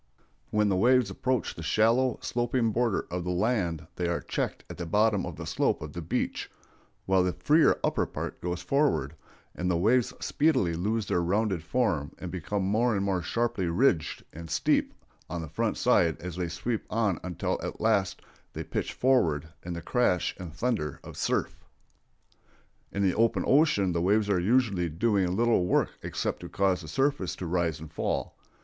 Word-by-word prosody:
When 105 0 +2
the 100 - +2
waves 120 +1 +4
approach 130 +5 -1
the - - -9
shallow, 115 +8 +2
sloping 120 -1 0
border 115 -2 0
of 90 0 -2
the 90 - -3
land 90 -5 0
they 90 - 0
are 85 - 0
checked - - -3
at - - -9
the 85 - -4
bottom 105 +2 +3
by - - -4
the - - -8
slope - - 0
of - - -8
the - - -5
beach, - - -2 0.6
while 95 -1 +3
the 90 -1 +1
freer 155 +2 +3
upper - - +1
part - - -6
goes 90 0 -3
forward, 140 - +1 0.4
and 90 0 -2
the 85 - +2
waves 115 +7 +3
speedily 145 - +1
lose 105 +6 -1
their 90 - +1
rounded 95 0 0
form 90 - 0
and 90 - -6
become 95 +3 -2
more 110 +4 +2
and 100 0 0
more 95 -2 0
sharply 115 0 -1
ridged 85 - +1
and 85 +1 -9
steep - - +1 0.3
on 85 -2 -4
the - - -6
front 110 +8 -1
side 85 -11 +3
as 90 -1 -6
they 90 -1 -2
sweep 110 +7 -3
on 105 -5 0
until 90 -2 -2
at - - -5
last 105 -4 +1 0.3
they - - -4
pitch - - -3
forward 80 - +2
in 90 - -5
the 85 -1 -6
crash 105 -4 +1
and 90 -3 -7
thunder 90 - -2
of - - -10
surf. - - -1 1.3
In 100 - -1
the 95 -2 +3
open 115 +1 +2
ocean 130 - +3
the 85 -1 0
waves 105 +3 +2
are 95 - +3
usually 100 -3 +2
doing 95 +1 +1
little 115 -3 +3
work - - +2
except - - -3
to - - -8
cause 95 -2 +1
the 80 - -9
surface 135 - 0
to 90 - -6
rise 85 -1 0
and 80 0 -10
fall. - - -2
95 Hz, 185 wpm, -28 LUFS, 85-115 Hz, 1.3 s, waves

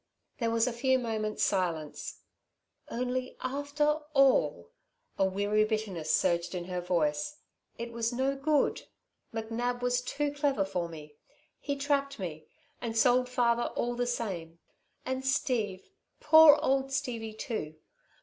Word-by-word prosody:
There 230 -2 +1
was 230 0 +2
a 250 - -1
few 260 +2 +2
moments' 220 -3 -2
silence. 170 -6 -2 0.7
"Only 250 +1 -3
after 285 +3 0 0.2
all" 275 - +3 0.5
a 195 - +5
weary 205 +3 +2
bitterness 215 -7 -2
surged 170 +1 +1
in 175 -1 -4
her 180 0 -3
voice 165 - 0 0.4
"it 235 0 -5
was 230 0 -1
no 265 +3 0
good. 290 +1 +1 0.4
McNab 235 +2 -2
was 245 0 +1
too 290 +3 -2
clever 285 -8 +1
for 175 -3 -3
me. 150 -2 -11 0.4
He 285 - -2
trapped 280 0 0
me 155 -6 -6 0.3
and 230 -2 -3
sold 250 +2 +4
father 240 -1 +2
all 240 0 -1
the 245 0 -1
same 180 -9 -3 0.5
and 260 0 -2
Steve, 235 -8 -1 0.3
poor 310 -1 +8
old 270 0 +1
Stevie, 240 -6 -3
too. 160 -9 -4
235 Hz, 135 wpm, -30 LUFS, 195-265 Hz, 0.7 s, poor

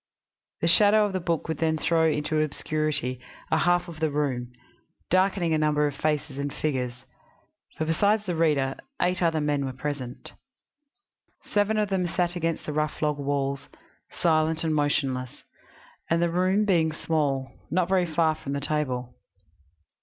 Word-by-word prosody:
The 165 - +2
shadow 210 +5 +5
of 205 - -3
the 185 - 0
book 170 -2 -1
would 160 - -3
then 160 -1 +1
throw 160 +1 +2
into 155 0 0
obscurity 155 -4 -2 0.3
a 160 - +3
half 175 +2 +2
of 165 -2 -9
the 160 -1 +1
room, 135 -4 -2 0.6
darkening 185 -2 +2
a 155 - +2
number 150 -1 +2
of 145 -2 -2
faces 150 -1 -1
and 140 0 -2
figures; 125 -4 -3 0.7
for 155 - -1
besides 205 +7 +2
the 180 -3 -2
reader, 145 -5 +1 0.2
eight 180 0 +1
other 165 -2 +2
men 145 -1 0
were 135 -1 -3
present. 130 -2 -5 1.1
Seven 210 +1 +1
of 210 -2 +1
them 185 -2 0
sat 175 0 -1
against 165 -1 -2
the 150 - -3
rough 150 0 -1
log 150 -1 +1
walls, 140 -1 -2 0.4
silent 160 -1 +1
and 160 -1 +1
motionless, 135 -4 -1 0.7
and, 165 - +2
the 170 0 +1
room 185 +4 +2
being 165 -5 +3
small, 145 -4 -1 0.2
not 175 +2 +1
very 185 -2 +2
far 160 0 +2
from 140 -2 -6
the 140 - -1
table. 130 -4 -2
155 Hz, 160 wpm, -26 LUFS, 145-170 Hz, 1.1 s, shadow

